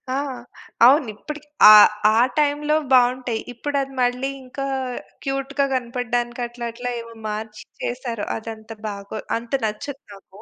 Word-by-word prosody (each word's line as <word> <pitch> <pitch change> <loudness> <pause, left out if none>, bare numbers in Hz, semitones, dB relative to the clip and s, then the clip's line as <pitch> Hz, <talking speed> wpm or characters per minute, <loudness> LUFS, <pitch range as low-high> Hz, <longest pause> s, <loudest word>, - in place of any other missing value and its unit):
ఆ! - - 0 0.7
అవును. 275 0 +5
ఇప్పటికి 300 +6 -9 0.2
ఆ! - - +12 0.5
ఆ - - +5 0.2
టైంలో 295 0 +2 0.2
బాగుంటాయి. 250 -2 +3
ఇప్పుడది 275 +2 -2
మళ్ళీ 250 +2 +1
ఇంకా 265 +2 -5 0.6
క్యూట్‌గా 275 0 -1
కనపడడానికి 245 -1 -2
అట్లా 240 0 -7
అట్లా 245 +2 -5
ఏవో 230 0 -12 0.2
మార్చి 215 0 -6 0.2
చేసారు. 240 -3 -3
అదంత 220 0 -9 0.2
బాగో 200 +1 -6 0.2
అంత 230 0 -10
నచ్చదు 275 +6 -5
నాకు. 195 0 -16
245 Hz, 125 wpm, -22 LUFS, 225-275 Hz, 0.7 s, ఆ